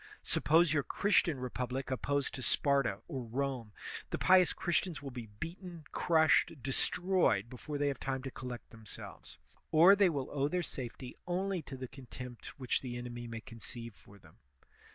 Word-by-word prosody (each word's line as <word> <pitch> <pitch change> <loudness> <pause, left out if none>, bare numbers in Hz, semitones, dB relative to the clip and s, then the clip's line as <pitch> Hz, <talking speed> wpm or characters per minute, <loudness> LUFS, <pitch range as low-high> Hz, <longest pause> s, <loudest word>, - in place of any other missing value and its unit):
Suppose 160 +1 +4
your 150 - +3
Christian 170 -3 +2
republic 125 +2 -3
opposed 140 +2 0
to 130 - -5
Sparta 135 -6 +2
or 135 -6 -4
Rome; 125 -1 -2 0.4
the - - -2
pious 185 -4 +6
Christians 175 -1 0
will 135 - -5
be 120 -3 -7
beaten, 170 0 -7
crushed, 160 +1 +4
destroyed, 135 - +2
before 145 +4 -5
they 145 0 +1
have 140 - -3
time 130 -1 -2
to 135 - -4
collect 125 -2 -7
themselves, 110 -2 -10 0.3
or 170 +5 +8
they 200 -2 +5
will 140 -5 -3
owe 140 -1 +1
their 180 +3 0
safety 125 -3 -6
only 185 0 0
to 140 -2 -8
the 130 0 -5
contempt 125 -2 -9
which 130 -2 0
the 120 -2 -4
enemy 120 -1 -6
may 115 -1 -6
conceive 115 0 -7
for 100 0 -17
them. - - -19
135 Hz, 165 wpm, -33 LUFS, 125-165 Hz, 0.4 s, or